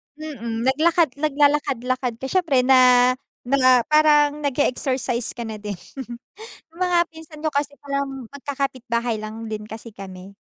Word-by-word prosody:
Mm, 235 -7 -5
naglakad 315 +5 +3
naglalakad-lakad 275 -4 +1
ka - - -4
siyempre 325 -9 +2
na 250 -1 +6 0.4
na 255 -1 +5
parang 300 -1 +4
nag-e-exercise 255 -3 0
ka 235 - -6
na 220 - -5
din. 205 -2 -6 1.0
Yung 340 - -16
mga 355 -1 +3
pinsan 320 -1 -12
ko - - +3
kasi 285 0 -2
parang 275 -2 -4
magkakapitbahay 255 -5 -3
lang 215 +1 -7
din 210 0 -4
kasi 220 +1 -9
kami. 190 -1 -10
265 Hz, 130 wpm, -22 LUFS, 235-295 Hz, 1.0 s, na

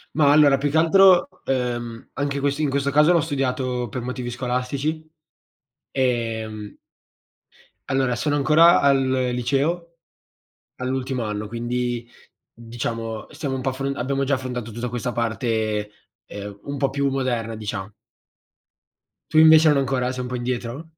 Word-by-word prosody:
Ma 145 -2 +5
allora 145 -2 +6
più 145 +1 -1
che 160 - +2
altro, 185 +2 +6 0.2
ehm, 120 -3 -3
anche 140 0 -2
quest 140 +1 -1
in 150 -3 +1
questo 140 0 0
caso 150 +4 +5
l'ho 170 - +4
studiato 130 -4 -2
per 130 - -4
motivi 125 0 -5
scolastici, 130 +5 -3 0.9
ehm 115 -5 -2 1.1
Allora 130 -2 +1
sono 145 +4 0
ancora 155 +4 +5
al 140 -1 +4
liceo, 135 +6 -1 0.8
all'ultimo 130 -1 -3
anno, 105 0 -4
quindi 120 +1 -3 0.5
diciamo 115 -1 -5
stiamo 145 -3 -4
un 130 - -4
po' 130 - 0
affr 135 +1 -3
abbiamo 135 +3 -1
già 140 +1 +1
affrontato 125 -3 -5
tutta 120 +2 -4
questa 125 +1 -3
parte, 110 -3 -1 0.4
ehm, 100 0 -8
un 140 0 -4
po' 135 0 0
più 140 0 0
moderna 120 -4 -2
dicia 105 -2 -5 1.4
Tu 155 - +2
invece 160 0 +8
non 150 - +4
ancora, 130 -2 0
sei 125 - -4
un 125 - -5
po' 125 - -3
indietro? 120 +4 -4
130 Hz, 145 wpm, -23 LUFS, 120-140 Hz, 1.4 s, invece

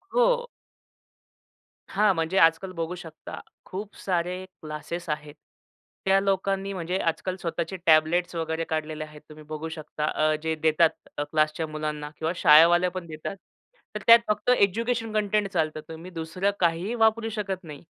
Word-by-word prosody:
हो. - - +3 1.4
हां. 205 0 +3
म्हणजे 165 +4 -1
आजकाल 165 +3 +4
बघू 165 +2 -2
शकता. 165 -3 -9 0.3
खूप 200 +3 -7
सारे 180 0 -2
क्लासेस 170 -1 -7
आहेत, 150 -1 -4 0.7
त्या 195 0 +5
लोकांनी 195 0 0
म्हणजे 180 +1 -2
आजकाल 180 +3 -1
स्वतःचे 170 +2 -3
टॅबलेट्स 165 +2 +3
वगैरे 160 0 -2
काढलेले 155 -1 -2
आहेत. 150 -1 -12
तुम्ही 155 0 -12
बघू 155 +1 -4
शकता 155 -1 -5
अ, 155 0 +1
जे 160 0 0
देतात 160 +1 +4 0.3
क्लासच्या 155 +2 0
मुलांना 150 -1 -4
किंवा 160 +1 -1
शाळेवाले 170 +4 +6
पण 180 -2 -7
देतात. 155 +4 -6 0.6
तर 210 - -3
त्यात 230 0 +10
फक्त 210 +3 0
एज्युकेशन 225 +3 +1
कंटेंट 210 -1 +1
चालतं. 155 -4 -1
तुम्ही 165 +3 -9
दुसरं 175 +4 -1
काहीही 175 +5 +1
वापरू 225 0 +2
शकत 195 -3 -4
नाही. 150 -2 -10
170 Hz, 145 wpm, -26 LUFS, 155-195 Hz, 1.4 s, त्यात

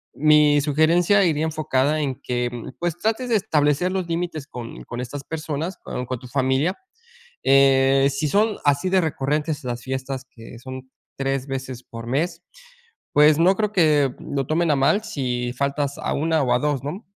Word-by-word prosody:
mi 150 0 +5
sugerencia 165 +7 +3
iría 155 -3 +1
enfocada 155 -1 0
en 135 -3 -2
que 120 -1 -1 0.3
pues, 175 -1 -2
trates 225 +6 -1
de 230 - +3
establecer 155 -2 +1
los 185 -2 -2
límites 165 -3 -3
con 120 -4 -8
con 120 - -7
estas 135 +3 -6
personas 160 +3 -4
con 125 - -6
con 130 +1 -4
tu 125 - -11
familia, 135 +7 0 0.7
eh, 135 0 +4
si 140 +3 -1
son 210 +6 +2
así 145 +5 +2
de 190 0 +4
recurrentes 150 0 -2
las 120 -1 -4
fiestas 130 0 -4
que 115 0 -12
son 130 +1 -9 0.3
3, 135 -1 -2
veces 130 -2 -5
por 115 0 -9
mes, 165 +8 -1 0.7
pues, 150 +1 +5
no 180 +3 +5
creo 210 0 -1
que 150 -8 +3
lo 140 -1 -3
tomen 165 +1 +1
a - - +3
mal 140 +11 +2
si 125 - -3
faltas 140 +2 -2
a - - -2
1, 160 0 +1
o 125 -2 +2
a 125 - +2
2, 145 -3 -1
¿no?, 180 +10 -6
145 Hz, 175 wpm, -22 LUFS, 130-165 Hz, 0.7 s, mi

